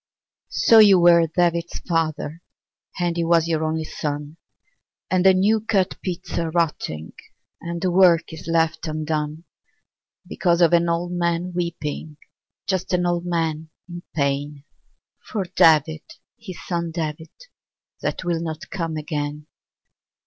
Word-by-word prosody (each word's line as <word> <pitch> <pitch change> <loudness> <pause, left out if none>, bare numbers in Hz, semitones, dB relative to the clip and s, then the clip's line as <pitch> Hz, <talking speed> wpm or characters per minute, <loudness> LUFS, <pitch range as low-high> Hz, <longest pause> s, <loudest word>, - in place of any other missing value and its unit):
lO 225 - +10
you 200 -4 +7
were 170 -1 +6
David's 170 0 0
father, 165 -1 -2 0.6
And 175 -1 0
he 170 - +1
was 165 -1 +3
your 160 -1 0
only 160 0 -1
son, 150 0 -5 0.7
And 185 -1 +2
the 190 -1 +6
new 210 +4 +3
cut 205 -4 0
peats 180 -2 -4
are 165 -1 -1
rotting 150 - -2 0.5
And 170 0 -5
the 185 - +1
work 175 -3 +4
is 160 - -10
left 165 0 0
undone. 155 0 -3 0.8
Because 175 -2 0
of 170 -1 +4
an 170 0 +3
old 170 +1 -1
man 175 0 -1
weeping, 160 -3 -4 0.5
Just 190 -1 -2
an 180 0 +2
old 175 0 -1
man 160 -2 -2 0.2
in 175 -1 -8
pain. 140 0 -1 0.7
For 205 -5 -2
David, 155 -1 +4 0.3
his 190 -6 -10
son 170 -2 -2
David, 160 -1 -4 0.7
That - - -3
will 170 -2 -1
not 160 -2 -6
come 165 -4 -3
again. 150 -1 -4
170 Hz, 135 wpm, -22 LUFS, 155-175 Hz, 0.8 s, lO